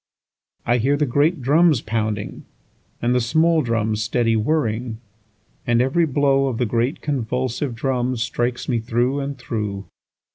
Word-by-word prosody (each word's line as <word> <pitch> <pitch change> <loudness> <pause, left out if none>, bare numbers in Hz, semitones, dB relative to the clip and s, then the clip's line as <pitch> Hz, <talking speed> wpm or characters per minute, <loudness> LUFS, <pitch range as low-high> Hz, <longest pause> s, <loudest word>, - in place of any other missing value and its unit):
4I 120 +1 +2
hear 140 +5 +2
the 150 - +1
great 145 +3 +1
drums 155 +1 +4
pounding, 110 -2 -3 0.6
And 120 +1 +2
the 125 - +2
small 160 +6 +3
drums 110 -4 -1
steady 115 +1 +1
whirring; 115 -2 -1 0.7
And 120 -1 +3
every 160 +7 +2
blow 135 -1 +2
of 125 -4 -2
the 125 - +1
great 120 +4 -1
convulsive 130 -1 -2
drums, 125 -1 -1
Strikes 120 +1 -2
me 120 -3 +1
through 120 +4 0
and 140 0 -4
through. 105 -5 -4
125 Hz, 145 wpm, -21 LUFS, 115-140 Hz, 0.7 s, drums